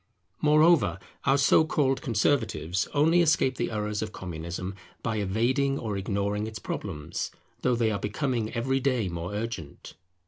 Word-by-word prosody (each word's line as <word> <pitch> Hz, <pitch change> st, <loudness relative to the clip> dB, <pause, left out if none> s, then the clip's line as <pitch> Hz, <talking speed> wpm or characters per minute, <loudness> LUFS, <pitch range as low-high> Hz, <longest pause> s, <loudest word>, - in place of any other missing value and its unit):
Moreover, 155 Hz, -, +5 dB, 0.3 s
our 135 Hz, 0 st, +4 dB
so 140 Hz, +3 st, +5 dB
called 135 Hz, -4 st, +1 dB
conservatives 110 Hz, -, 0 dB
only 160 Hz, +4 st, +4 dB
escape 155 Hz, -6 st, +2 dB
the 120 Hz, -, -1 dB
errors 105 Hz, -1 st, -2 dB
of 110 Hz, -1 st, -3 dB
Communism 90 Hz, +1 st, -5 dB, 0.3 s
by 115 Hz, -2 st, -1 dB
evading 120 Hz, +8 st, +1 dB
or 110 Hz, -5 st, -3 dB
ignoring 100 Hz, +2 st, -1 dB
its 110 Hz, 0 st, -6 dB
problems, 80 Hz, -7 st, -4 dB, 0.3 s
though 125 Hz, -1 st, +2 dB
they 115 Hz, -2 st, +1 dB
are 100 Hz, -, -1 dB
becoming 115 Hz, +1 st, -1 dB
every 130 Hz, +3 st, 0 dB
day 125 Hz, -7 st, +1 dB
more 85 Hz, +1 st, -4 dB
urgent. 105 Hz, -9 st, -5 dB
115 Hz, 145 wpm, -27 LUFS, 100-135 Hz, 0.3 s, Moreover